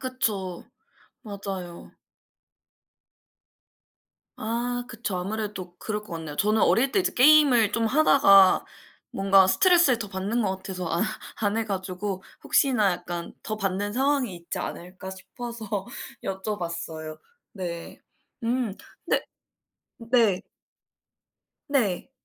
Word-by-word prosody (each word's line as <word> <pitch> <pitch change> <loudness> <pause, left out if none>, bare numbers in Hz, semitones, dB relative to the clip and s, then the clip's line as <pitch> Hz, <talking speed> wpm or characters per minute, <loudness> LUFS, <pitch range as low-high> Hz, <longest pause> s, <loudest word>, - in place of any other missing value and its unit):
그쵸. 210 -9 -2 0.6
맞아요. 195 -5 -7 2.4
아 240 +2 -2
그쵸. 225 -5 -4
아무래도 190 -2 -4
그럴 210 -1 -3
것 210 - -12
같네요. 160 -3 -6
저는 215 +4 +2
어릴 265 +4 +3
때 - - +1
이제 365 - 0
게임을 255 -5 +6
좀 230 +1 +1
하다가 220 -8 +6 0.5
뭔가 195 -1 +5
스트레스를 340 - +5
더 210 - -4
받는 200 +5 -1
것 190 -2 -1
같아서 185 -2 -5
안 170 - 0 0.4
안 205 0 +1
해 225 - 0
가지고 190 -1 -4 0.2
혹시나 245 -8 +3
약간 175 -1 -5
더 215 - -3
받는 200 +1 -2
상황이 265 -5 +1
있지 170 0 -6
않을까 185 +2 -6
싶어서 235 +4 -8 0.6
여쭤봤어요. 170 -5 -4 0.3
네. 175 -4 -6 0.4
음. 235 -3 -1 0.3
근데 - - +1 0.8
네. 230 -5 +2 1.3
네. 255 -5 0
205 Hz, 220 characters per minute, -26 LUFS, 185-235 Hz, 2.4 s, 게임을